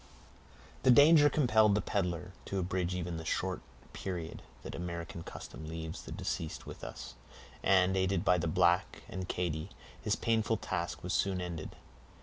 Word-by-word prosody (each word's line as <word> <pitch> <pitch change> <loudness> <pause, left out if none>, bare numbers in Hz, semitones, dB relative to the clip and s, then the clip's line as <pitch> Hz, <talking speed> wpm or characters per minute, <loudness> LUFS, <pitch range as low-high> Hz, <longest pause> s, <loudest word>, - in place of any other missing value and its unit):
The - - +3
danger 145 +4 +8
compelled 110 -9 +4
the - - +3
peddler 90 -3 -1
to 100 - -3
abridge 90 -1 -1
even 90 -2 -3
the 80 - -5
short 80 - -1 0.3
period 85 -4 -5 0.2
that - - -6
American 85 -1 -5
custom 80 -1 -8
leaves 80 0 -5
the - - -10
deceased 80 -2 -3
with - - -9
us; - - -7 0.5
and, 95 0 +4
aided 95 -1 +1
by 90 - +4
the 85 - -1
black 90 +1 +2
and 95 -1 -5
Katy, 85 -1 -2 0.3
his - - +1
painful 115 -1 +1
task 85 -4 -3
was 90 - -2
soon 95 -1 +1
ended. 85 -3 -5
90 Hz, 155 wpm, -32 LUFS, 85-100 Hz, 0.5 s, danger